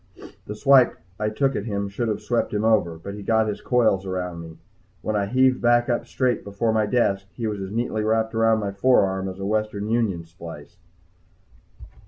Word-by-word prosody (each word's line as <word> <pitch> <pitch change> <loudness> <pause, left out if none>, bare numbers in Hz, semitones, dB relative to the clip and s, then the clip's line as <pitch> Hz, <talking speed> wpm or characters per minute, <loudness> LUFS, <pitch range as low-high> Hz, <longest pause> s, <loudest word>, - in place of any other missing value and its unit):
The 105 - -5
swipe 130 +3 +5 0.2
I 105 0 0
took 135 +5 0
at 105 - -3
him 100 -3 -2
should 100 +4 -3
have 110 - -2
swept 120 -3 -1
him 105 - 0
over, 105 -7 +2
but 100 +5 -8
he 105 - -8
got 110 +2 +2
his 105 - -4
coils 110 -6 +2
around 90 -2 -4
me. 80 -1 -11 0.5
When 110 - -1
I 100 -1 0
heaved 130 +3 +3
back 120 0 +3
up 120 0 -1
straight 125 0 0
before 100 +3 -1
my 110 -1 +1
desk, 100 -6 +1
he 115 - -5
was 105 -2 -3
as 95 - -5
neatly 110 0 -2
wrapped 110 +1 0
around 115 -1 +3
my 100 -1 -2
forearm 95 -3 +2
as 95 - -8
a 95 - -5
Western 105 0 -1
Union 110 -8 0
splice. 85 -2 -11
105 Hz, 200 wpm, -23 LUFS, 100-115 Hz, 0.5 s, swipe